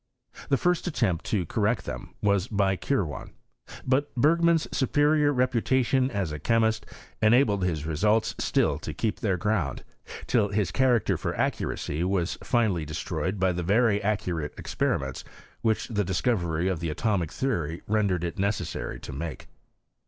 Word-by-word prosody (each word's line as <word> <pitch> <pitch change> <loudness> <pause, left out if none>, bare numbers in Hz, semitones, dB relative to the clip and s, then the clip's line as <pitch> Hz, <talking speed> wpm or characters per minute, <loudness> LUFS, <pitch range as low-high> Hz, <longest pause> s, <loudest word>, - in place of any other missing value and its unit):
The 135 - +3
first 180 +3 +1
attempt 105 - 0
to 95 -5 0
correct 110 +7 0
them - - -7
was 100 -1 +2
by 100 -3 +1
Kirwan. 95 - -2 0.5
But 135 +3 0
Berg 155 +7 +3
man's 170 -1 +3
superior 145 +2 +3
reputation 130 0 +2
as 100 - -2
a 75 - -5
chemist 110 +4 +1 0.3
enabled 110 -3 +4
his 80 -4 -1
results 105 +8 +1
still - - +1
to - - -6
keep 110 -2 -1
their 95 -4 0
ground, 90 -7 -1 0.4
till 115 -5 +2
his 100 -3 0
character 125 -4 +2
for - - -3
accuracy 75 +4 -1
was 90 -1 -1
finally 110 -9 +1
destroyed 80 +4 -3
by 95 0 +3
the 90 0 -2
very 105 +4 +3
accu 100 -4 -1
rate 75 -2 -4
experiments 65 -1 -2 0.4
which 110 -2 0
the 105 -3 0
discovery 90 -3 0
of 95 -4 -1
the 85 -1 -2
atomic 90 0 0
theory 85 - -2
rendered 100 -5 +1
it 85 +1 -4
necessary 100 +2 -2
to - - -7
make. 75 +1 -6
105 Hz, 150 wpm, -27 LUFS, 85-120 Hz, 0.5 s, enabled